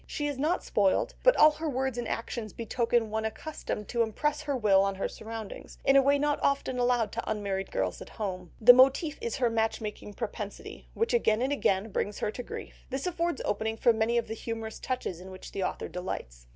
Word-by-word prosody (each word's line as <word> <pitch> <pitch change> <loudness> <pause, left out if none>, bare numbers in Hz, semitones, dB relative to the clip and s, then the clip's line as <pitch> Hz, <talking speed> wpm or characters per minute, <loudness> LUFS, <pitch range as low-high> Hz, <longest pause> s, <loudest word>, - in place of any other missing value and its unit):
She 295 - -3
is 290 -2 -2
not 315 +6 +1
spoilt, 205 - +2
but - - +6
all 305 - +8
her 310 +1 -4
words 265 -2 -1
and 240 - -3
actions 230 -2 -4
betoken 230 -1 0
one 220 0 -1
accustomed 220 -2 -4
to 235 - +1
impress 295 +7 0
her 285 -3 -1
will 200 -5 +5
on 195 0 0
her 190 - -1
surroundings, 220 -2 -8
in 270 - +5
a 275 - +8
way 280 +1 +4
not 290 0 +1
often 275 -2 0
allowed 245 -3 +2
to 230 - -4
unmarried 200 -2 -2
girls 95 -2 -2
at - - -9
home. 185 -5 -4
The 245 +2 +10
motif 270 +5 +4
is 465 0 -2
her 245 -4 +1
match 225 0 +1
making 210 -1 -7
propensity, 210 -3 -6
which 455 +1 0
again 235 - +3
and 270 +2 +1
again 200 -5 +1
brings 205 +1 -2
her 210 - -1
to 245 - -6
grief; - - -9
this 270 +3 -3
affords 340 -4 -1
opening 220 +2 -1
for 235 - +4
many 225 +2 +1
of 235 - 0
the - - -4
humorous 225 -1 -5
touches 255 -9 -3
in 185 +1 -10
which 185 0 -10
the 195 - -4
author - - -2
delights. - - -6
230 Hz, 220 wpm, -29 LUFS, 210-275 Hz, -, The